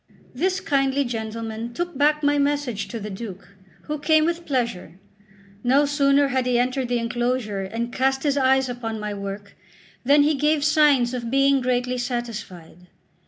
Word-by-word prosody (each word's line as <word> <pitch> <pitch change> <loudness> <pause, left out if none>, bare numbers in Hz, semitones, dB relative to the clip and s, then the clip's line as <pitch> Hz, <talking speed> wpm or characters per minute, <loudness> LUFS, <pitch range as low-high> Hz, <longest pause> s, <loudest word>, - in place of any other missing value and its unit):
This 370 +8 0
kindly 275 -2 +1
gentleman 225 0 -5
took 345 -2 -3
back 300 +2 +2
my 290 0 +3
message 280 -7 -1
to 230 - -6
the 210 0 -6
Duke, 195 -1 -8 0.3
who 300 0 -4
came 310 +1 +3
with 340 0 -2
pleasure. 230 - -2 0.6
No 270 +4 +4
sooner 280 -1 +3
had 260 -1 0
he 245 -1 +2
entered 255 +1 0
the 245 0 0
enclosure 240 -3 -1
and 230 +5 -4
cast 265 0 0
his 285 -2 +1
eyes 265 -1 +3
upon 230 -3 -5
my 210 0 -4
work, 200 0 -7 0.5
than 285 +3 +5
he 305 +2 +3
gave 295 +1 +1
signs 290 -5 +3
of 235 -2 -4
being 275 +1 +3
greatly 250 0 -1
satisfied. 215 -9 -6
255 Hz, 165 wpm, -23 LUFS, 230-285 Hz, 0.6 s, than